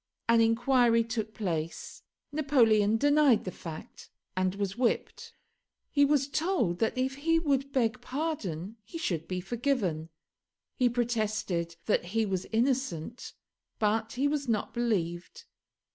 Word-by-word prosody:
An 230 Hz, 0 st, +5 dB
inquiry 230 Hz, 0 st, +4 dB
took 220 Hz, -1 st, -3 dB
place. 165 Hz, -6 st, -4 dB, 0.3 s
Napoleon 230 Hz, -8 st, +3 dB
denied 290 Hz, -2 st, +4 dB
the 185 Hz, -, -3 dB
fact, 160 Hz, -3 st, -9 dB, 0.3 s
and 185 Hz, 0 st, 0 dB
was 200 Hz, -1 st, -2 dB
whipped. 240 Hz, 0 st, -1 dB, 0.6 s
He 285 Hz, -1 st, +4 dB
was 280 Hz, -1 st, +2 dB
told 285 Hz, -, 0 dB
that 225 Hz, +3 st, 0 dB
if 265 Hz, +1 st, -1 dB
he 330 Hz, +3 st, +2 dB
would 280 Hz, -4 st, 0 dB
beg 250 Hz, -2 st, 0 dB
pardon 230 Hz, -, -4 dB
he 330 Hz, -, -8 dB
should 170 Hz, -, -2 dB
be 185 Hz, -1 st, -2 dB
forgiven. 195 Hz, -, -1 dB, 0.7 s
He 250 Hz, -1 st, +3 dB
protested 215 Hz, -8 st, -1 dB
that 210 Hz, -, +1 dB
he 225 Hz, -, +3 dB
was 190 Hz, -2 st, -2 dB
innocent, 235 Hz, -, -1 dB, 0.4 s
but 220 Hz, +1 st, 0 dB
he 270 Hz, +3 st, +1 dB
was 285 Hz, -2 st, -1 dB
not 215 Hz, -2 st, -1 dB
believed. 215 Hz, -, -2 dB
230 Hz, 130 wpm, -29 LUFS, 195-270 Hz, 0.7 s, An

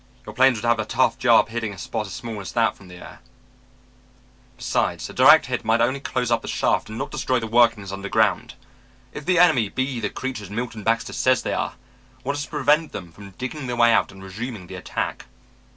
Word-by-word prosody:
"Your -, -, -8 dB
planes 130 Hz, -1 st, +4 dB
would 115 Hz, +2 st, -3 dB
have 120 Hz, -1 st, +3 dB
a 110 Hz, -, -1 dB
tough 130 Hz, +3 st, +1 dB
job 120 Hz, -3 st, +4 dB
hitting 115 Hz, -2 st, -3 dB
a -, -, -12 dB
spot 110 Hz, +3 st, -4 dB
as -, -, -8 dB
small 115 Hz, -4 st, -6 dB
as 95 Hz, -, -8 dB
that 115 Hz, -2 st, +2 dB
from 100 Hz, -, -16 dB
the 90 Hz, -, -12 dB
air. 90 Hz, -, -12 dB, 1.4 s
Besides, -, -, -1 dB
a -, -, -13 dB
direct -, -, +7 dB
hit -, -, -3 dB
might 110 Hz, +1 st, +2 dB
only 130 Hz, +4 st, +1 dB
close 125 Hz, -3 st, -2 dB
up 115 Hz, -, +2 dB
the -, -, -9 dB
shaft -, -, 0 dB
and 110 Hz, -, -7 dB
not -, -, -4 dB
destroy 130 Hz, -1 st, 0 dB
the 115 Hz, -, -4 dB
workings 115 Hz, -3 st, +2 dB
underground. 100 Hz, 0 st, 0 dB, 0.6 s
If 150 Hz, -, -8 dB
the 185 Hz, -1 st, +3 dB
enemy 130 Hz, -, +4 dB
be 130 Hz, 0 st, -2 dB
the 105 Hz, -2 st, -2 dB
creatures 115 Hz, -8 st, -5 dB
Milton 115 Hz, +1 st, -5 dB
Baxter 115 Hz, +2 st, 0 dB
says 130 Hz, -1 st, +2 dB
they -, -, -2 dB
are, -, -, -2 dB, 0.5 s
what 140 Hz, +2 st, -2 dB
is 145 Hz, 0 st, -3 dB
to -, -, -18 dB
prevent 150 Hz, +2 st, +1 dB
them 85 Hz, -2 st, -7 dB
from 100 Hz, +4 st, -12 dB
digging 130 Hz, +2 st, -5 dB
their 120 Hz, -, -2 dB
way 115 Hz, -1 st, +5 dB
out -, -, +2 dB
and 95 Hz, 0 st, -13 dB
resuming 105 Hz, +1 st, -6 dB
the 95 Hz, -, -11 dB
attack?" 90 Hz, -, -4 dB
115 Hz, 220 wpm, -23 LUFS, 105-130 Hz, 1.4 s, direct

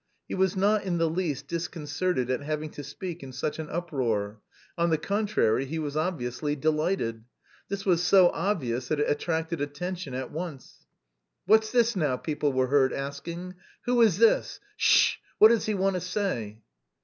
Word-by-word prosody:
He -, -, -6 dB
was 190 Hz, 0 st, +1 dB
not 205 Hz, +2 st, +2 dB
in 180 Hz, -3 st, -1 dB
the 165 Hz, 0 st, +2 dB
least 160 Hz, -4 st, -2 dB
disconcerted 165 Hz, -4 st, -2 dB
at 130 Hz, -, -1 dB
having 155 Hz, +1 st, -3 dB
to 145 Hz, -, -8 dB
speak 170 Hz, +5 st, -7 dB
in 135 Hz, -1 st, -8 dB
such 150 Hz, +4 st, -3 dB
an 155 Hz, -, -5 dB
uproar, 115 Hz, -11 st, -2 dB, 0.3 s
on 170 Hz, 0 st, +1 dB
the 160 Hz, -, +2 dB
contrary, 200 Hz, -, +1 dB
he 160 Hz, +4 st, -4 dB
was 150 Hz, -2 st, -3 dB
obviously 150 Hz, -4 st, -2 dB
delighted. 155 Hz, -6 st, 0 dB, 0.5 s
This 200 Hz, 0 st, -4 dB
was 175 Hz, -3 st, +3 dB
so 180 Hz, +1 st, +6 dB
obvious 130 Hz, -, -2 dB
that 155 Hz, +1 st, -1 dB
it 145 Hz, -, +1 dB
attracted 160 Hz, +1 st, -1 dB
attention 145 Hz, 0 st, -4 dB
at 130 Hz, -, -4 dB
once. 160 Hz, -5 st, -8 dB, 0.6 s
"What's 220 Hz, +3 st, +4 dB
this 235 Hz, -2 st, +3 dB
now?" 150 Hz, -8 st, +1 dB
people 150 Hz, -1 st, -1 dB
were 130 Hz, -1 st, +2 dB
heard 130 Hz, 0 st, +3 dB
asking. 165 Hz, +6 st, -5 dB, 0.3 s
"Who 245 Hz, -1 st, +3 dB
is 215 Hz, -7 st, +5 dB
this? 225 Hz, +1 st, +3 dB, 0.2 s
Sh 460 Hz, -, +4 dB
h! -, -, -34 dB, 0.2 s
What 215 Hz, -, +9 dB
does 230 Hz, -2 st, +2 dB
he 215 Hz, -, 0 dB
want 195 Hz, 0 st, +1 dB
to 180 Hz, -, -2 dB
say?" 120 Hz, -, -3 dB
160 Hz, 175 wpm, -27 LUFS, 140-185 Hz, 0.6 s, What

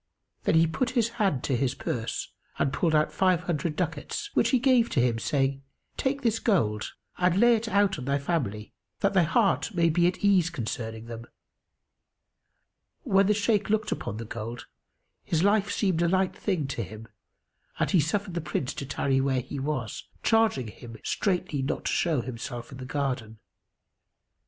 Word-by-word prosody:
Then -, -, +3 dB
he 165 Hz, 0 st, +6 dB
put 235 Hz, +10 st, -1 dB
his 230 Hz, -1 st, +3 dB
hand 185 Hz, -11 st, +1 dB
to 135 Hz, -, 0 dB
his 125 Hz, +1 st, 0 dB
purse 115 Hz, -1 st, -3 dB, 0.3 s
and 135 Hz, -, 0 dB
pulled 165 Hz, -3 st, +1 dB
out 150 Hz, 0 st, +2 dB
five 185 Hz, -2 st, +3 dB
hundred 165 Hz, -3 st, -2 dB
ducats, 180 Hz, -, -3 dB
which -, -, +3 dB
he 260 Hz, -, +4 dB
gave 250 Hz, -2 st, +4 dB
to 140 Hz, -, 0 dB
him 120 Hz, -2 st, +2 dB
saying, 135 Hz, +2 st, 0 dB, 0.3 s
"Take 275 Hz, +1 st, -1 dB
this 225 Hz, -2 st, +2 dB
gold 110 Hz, -, +1 dB, 0.3 s
and 180 Hz, +1 st, +3 dB
lay 240 Hz, +1 st, +6 dB
it 225 Hz, +1 st, -3 dB
out 200 Hz, -5 st, +2 dB
on 125 Hz, -, -6 dB
thy 140 Hz, +1 st, +1 dB
family, 135 Hz, -, -2 dB, 0.3 s
that 200 Hz, -, +2 dB
thy 190 Hz, -, +5 dB
heart 195 Hz, +4 st, +2 dB
may 170 Hz, -1 st, +4 dB
be 175 Hz, +2 st, +3 dB
at 180 Hz, +3 st, -2 dB
ease 185 Hz, -4 st, +4 dB
concerning 115 Hz, -5 st, -5 dB
them." 115 Hz, 0 st, -8 dB, 1.8 s
When 195 Hz, -, +3 dB
the 210 Hz, -, +3 dB
Shaykh 210 Hz, -1 st, +1 dB
looked 215 Hz, 0 st, +1 dB
upon 105 Hz, -, -3 dB
the 115 Hz, -, -5 dB
gold, 115 Hz, +2 st, -6 dB, 0.6 s
his 165 Hz, +1 st, 0 dB
life 205 Hz, 0 st, +3 dB
seemed 185 Hz, -5 st, +1 dB
a 170 Hz, -, +3 dB
light 190 Hz, +1 st, +1 dB
thing 185 Hz, -8 st, -1 dB
to 120 Hz, -3 st, -2 dB
him[FN#283] 110 Hz, +1 st, -10 dB, 0.7 s
and -, -, +1 dB
he 185 Hz, -, +5 dB
suffered 185 Hz, +5 st, -1 dB
the 170 Hz, -, -2 dB
Prince 145 Hz, -3 st, -2 dB
to 140 Hz, -, -6 dB
tarry 135 Hz, 0 st, +1 dB
where 135 Hz, -1 st, +1 dB
he 140 Hz, -, -6 dB
was, 135 Hz, -5 st, -3 dB, 0.2 s
charging 220 Hz, -, +2 dB
him 115 Hz, +1 st, -11 dB
straitly 180 Hz, -8 st, -1 dB
not 135 Hz, -, -2 dB
to -, -, 0 dB
show 160 Hz, -7 st, +1 dB
himself 120 Hz, 0 st, -6 dB
in 130 Hz, -, -9 dB
the 130 Hz, -, -6 dB
garden. 130 Hz, -5 st, -3 dB
160 Hz, 180 wpm, -27 LUFS, 125-200 Hz, 1.8 s, he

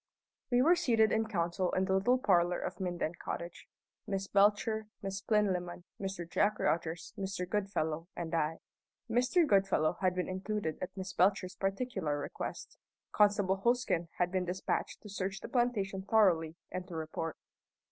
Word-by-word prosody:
We 245 Hz, 0 st, +4 dB
were 340 Hz, +5 st, +6 dB
seated 230 Hz, -10 st, +3 dB
in 220 Hz, 0 st, +1 dB
council 175 Hz, -2 st, 0 dB
in 185 Hz, -, +2 dB
the 190 Hz, -, 0 dB
little 240 Hz, +7 st, +3 dB
parlour 180 Hz, -6 st, +3 dB
of -, -, -5 dB
Minden 175 Hz, -3 st, -2 dB
Cottage 170 Hz, 0 st, -5 dB, 0.4 s
Miss 195 Hz, -2 st, -1 dB
Belcher, 210 Hz, +2 st, +3 dB, 0.2 s
Miss 195 Hz, 0 st, -3 dB
Plinlimmon, 185 Hz, -5 st, 0 dB, 0.2 s
Mr. 190 Hz, -3 st, -4 dB
Jack 205 Hz, +5 st, +2 dB
Rogers, 165 Hz, 0 st, -1 dB
Mr. 195 Hz, -2 st, -3 dB
Goodfellow, 175 Hz, -5 st, -1 dB
and 170 Hz, -1 st, -5 dB
I. 160 Hz, 0 st, 0 dB, 0.5 s
Mr. 250 Hz, +9 st, +3 dB
Goodfellow 195 Hz, -, +2 dB
had 185 Hz, -1 st, +2 dB
been 180 Hz, -, -1 dB
included 190 Hz, -3 st, -3 dB
at 185 Hz, -, -2 dB
Miss 190 Hz, 0 st, -5 dB
Belcher's 185 Hz, 0 st, +2 dB
particular 195 Hz, -6 st, -1 dB
request. 145 Hz, -, -6 dB, 0.3 s
Constable 205 Hz, -2 st, +3 dB
Hosken 240 Hz, -8 st, +2 dB
had 180 Hz, 0 st, +1 dB
been 185 Hz, -1 st, 0 dB
despatched 180 Hz, +2 st, -2 dB
to -, -, -9 dB
search 195 Hz, 0 st, -3 dB
the -, -, -7 dB
plantation 215 Hz, -6 st, 0 dB
thoroughly 180 Hz, -6 st, +3 dB, 0.2 s
and 185 Hz, 0 st, -4 dB
to 175 Hz, -, -8 dB
report. 160 Hz, 0 st, -4 dB
190 Hz, 155 wpm, -32 LUFS, 175-210 Hz, 0.5 s, were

